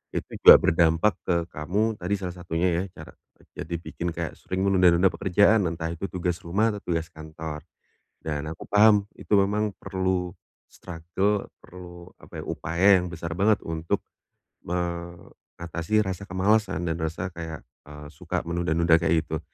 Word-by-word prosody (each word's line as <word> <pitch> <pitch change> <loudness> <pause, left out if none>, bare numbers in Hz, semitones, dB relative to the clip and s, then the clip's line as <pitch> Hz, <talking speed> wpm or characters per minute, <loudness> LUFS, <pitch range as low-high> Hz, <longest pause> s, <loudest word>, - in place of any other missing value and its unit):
itu - - -4
juga - - +11
berdampak 85 +4 +3
ke 90 - 0 0.2
kamu 105 +8 -1
tadi 90 +3 -1
salah 90 -2 -5
satunya 85 0 -2
ya, - - -3
cara - - -11 0.3
kerja - - -12
dibikin 85 +1 -5
kayak 85 0 -5
sering 95 +1 -3
menunda-nunda 90 -1 +5
pekerjaan, 100 +3 +3
entah 80 0 -4
itu 85 +4 -5
tugas 90 -1 -3
rumah 105 +6 +1
atau 105 - -7
tugas 85 -2 -2
kantor. 80 -1 -7 0.6
Dan 75 -1 -3
aku 80 - -8
paham 105 0 +5 0.2
itu - - -13
memang 100 +1 +1
perlu 95 -2 -2 0.4
struggle, 95 +4 -2 0.2
perlu 90 -1 -12
apa - - -11
ya, - - -6
upaya 85 +5 0 0.2
yang 90 - -6
besar 85 -1 -5
banget 100 +3 +3
untuk 80 0 -2 0.7
mengatasi 85 +2 -3
rasa 95 +1 -5
kemalasan 95 -1 +1
dan 85 0 -2
rasa 80 +3 -3
kayak, 80 -2 -7 0.2
eee, 75 0 -10
suka - - -4
menunda-nunda 85 -1 +2
kayak 85 -1 +2
gitu. 80 0 -3
85 Hz, 150 wpm, -25 LUFS, 80-95 Hz, 0.7 s, juga